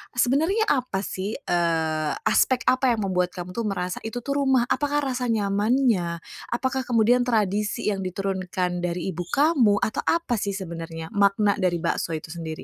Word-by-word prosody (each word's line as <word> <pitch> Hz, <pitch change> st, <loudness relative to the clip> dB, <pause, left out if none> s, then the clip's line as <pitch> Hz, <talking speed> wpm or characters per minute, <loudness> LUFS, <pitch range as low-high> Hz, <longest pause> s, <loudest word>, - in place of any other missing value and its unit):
sebenernya 315 Hz, -, +2 dB
apa 250 Hz, -8 st, -1 dB
sih, 195 Hz, +3 st, -4 dB
eee, 160 Hz, -, 0 dB
aspek 245 Hz, +3 st, +3 dB
apa 255 Hz, -1 st, +3 dB
yang 215 Hz, -, -3 dB
membuat 180 Hz, 0 st, 0 dB
kamu 180 Hz, 0 st, -6 dB
tuh 230 Hz, +2 st, -2 dB
merasa 180 Hz, -2 st, -3 dB
itu 240 Hz, +2 st, -5 dB
tuh 280 Hz, 0 st, -1 dB
rumah? 265 Hz, -3 st, +3 dB
Apakah 290 Hz, 0 st, +1 dB
rasa 250 Hz, -2 st, -2 dB
nyamannya, 205 Hz, -4 st, +1 dB, 0.2 s
apakah 260 Hz, +2 st, -2 dB
kemudian 245 Hz, +1 st, +3 dB
tradisi 210 Hz, -2 st, 0 dB
yang 195 Hz, -, -3 dB
diturunkan 185 Hz, -1 st, -2 dB
dari 175 Hz, +1 st, -2 dB
ibu 175 Hz, 0 st, -5 dB
kamu, 270 Hz, -, +3 dB
atau 215 Hz, -, -1 dB
apa 330 Hz, -9 st, +1 dB
sih 200 Hz, -1 st, -2 dB
sebenarnya 165 Hz, -3 st, -6 dB
makna 200 Hz, 0 st, +2 dB
dari 180 Hz, -2 st, +1 dB
bakso 165 Hz, -1 st, -1 dB
itu 155 Hz, 0 st, -7 dB
sendiri? 160 Hz, -2 st, -6 dB
205 Hz, 160 wpm, -24 LUFS, 180-250 Hz, 0.2 s, aspek